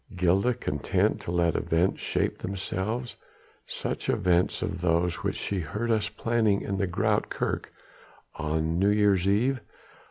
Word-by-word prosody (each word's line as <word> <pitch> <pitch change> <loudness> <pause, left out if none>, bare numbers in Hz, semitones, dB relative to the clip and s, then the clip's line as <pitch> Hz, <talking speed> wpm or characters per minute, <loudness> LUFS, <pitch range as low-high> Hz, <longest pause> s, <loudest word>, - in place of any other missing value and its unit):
Gilda 95 +7 +2
content 75 - 0
to - - -5
let 85 -2 +2
events 85 +3 +1
shape - - -1
themselves 100 +5 -3 0.5
such - - -4
events 90 +1 +2
as 95 -3 -3
those 85 0 +1
which - - -2
she 100 - -2
heard 105 +8 -2
us 110 -1 +1
planning 115 -4 +1
in 100 -1 -3
the 100 - +1
Groote 85 - +1
Kerk - - -2 0.6
on 80 +1 -1
New 100 +2 +4
Year's 100 -3 +3
Eve? 125 +7 +2
95 Hz, 140 wpm, -27 LUFS, 85-105 Hz, 0.6 s, New